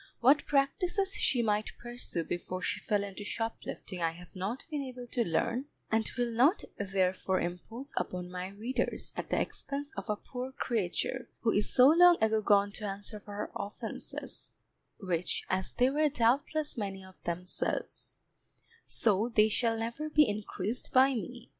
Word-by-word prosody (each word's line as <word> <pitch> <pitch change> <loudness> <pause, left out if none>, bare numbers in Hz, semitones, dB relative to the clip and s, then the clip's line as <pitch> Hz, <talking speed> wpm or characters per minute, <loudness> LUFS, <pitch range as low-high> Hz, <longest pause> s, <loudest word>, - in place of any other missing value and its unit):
What 270 +5 +5
practices 360 +8 +2
she 250 -11 +2
might 210 -1 0
pursue 240 -8 -4
before 175 +2 -4
she - - -1
fell 205 -1 +1
into 200 +1 -6
shoplifting 210 -4 -4
I 165 -1 +1
have 175 +2 -13
not 195 +7 -3
been 295 -2 -1
able 255 -2 -6
to 240 0 0
learn, 225 - 0 0.3
and 220 -1 +2
will 240 -1 +1
not 265 - +4 0.2
therefore 190 -1 +1
impose 225 +10 -5
upon 180 0 -3
my 180 0 -4
readers 230 +6 -2
at - - -4
the - - +2
expense 285 +1 -3
of - - -6
a 210 - +2
poor 250 +4 -6
creature, 235 +2 -1
who 225 - +3
is 205 0 +1
so 255 +2 +8
long 350 +2 +8
ago 220 0 +3
gone 205 -1 +4
to 215 - -5
answer 200 +2 -5
for 205 0 -10
her 210 - -4
offences, 200 - -5 0.5
which, 180 -3 -1
as 190 0 0
they 255 +1 +3
were 300 +1 +3
doubtless 280 +3 +1
many 195 -2 -4
of 190 -1 -17
themselves, 180 +2 -3 0.7
so 215 +1 +2
they 220 -2 +5
shall 225 +1 +1
never 235 +7 -3
be 300 -1 +5
increased 210 +2 -3
by 265 +1 +6
me. 240 +1 -5
225 Hz, 165 wpm, -31 LUFS, 195-255 Hz, 0.7 s, so